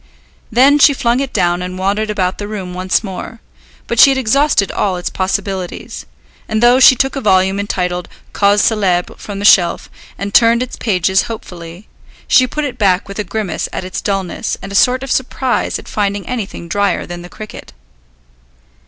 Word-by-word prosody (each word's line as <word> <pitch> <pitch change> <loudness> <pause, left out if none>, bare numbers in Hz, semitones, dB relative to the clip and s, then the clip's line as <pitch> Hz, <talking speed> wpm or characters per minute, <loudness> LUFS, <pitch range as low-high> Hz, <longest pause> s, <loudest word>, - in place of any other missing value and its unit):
Then 270 +5 +5
she 285 -1 +6
flung 240 -1 +1
it 275 -1 -3
down 175 0 0
and 180 0 -5
wandered 200 +3 -1
about 185 -3 -1
the 205 - -4
room 195 -4 -6
once 185 +3 0
more; 200 +3 -7 0.5
but 235 - -3
she - - +9
had 270 - +1
exhausted 265 -3 +2
all 190 -3 -1
its 180 - -4
possibilities; 190 -1 -4 0.4
and 220 +1 0
though 245 +2 +5
she 260 0 +8
took 270 +3 -1
a 275 - -3
volume 190 -2 +2
entitled 180 -3 -3 0.2
Causes 205 0 +3
Célèbres 190 -5 0
from 205 -2 -7
the 200 - -3
shelf, 175 -5 +4 0.3
and 200 +1 -5
turned 235 +1 +4
its 255 - -8
pages 190 -2 0
hopefully, 175 -4 -9 0.4
she 255 - +4
put 300 +4 -3
it 265 - -6
back 190 -3 +2
with 200 +1 -8
a - - 0
grimace 200 -3 -3
at 185 - -5
its 185 - -5
dullness 195 -3 -3
and 195 - -9
a - - -7
sort 255 +5 +3
of 270 - -5
surprise 260 0 -1
at - - -13
finding 200 -1 -2
anything 215 -8 -5
drier 200 +1 0
than 175 0 -8
the 175 - -11
cricket. 215 +2 -10
200 Hz, 185 wpm, -15 LUFS, 185-235 Hz, 0.5 s, she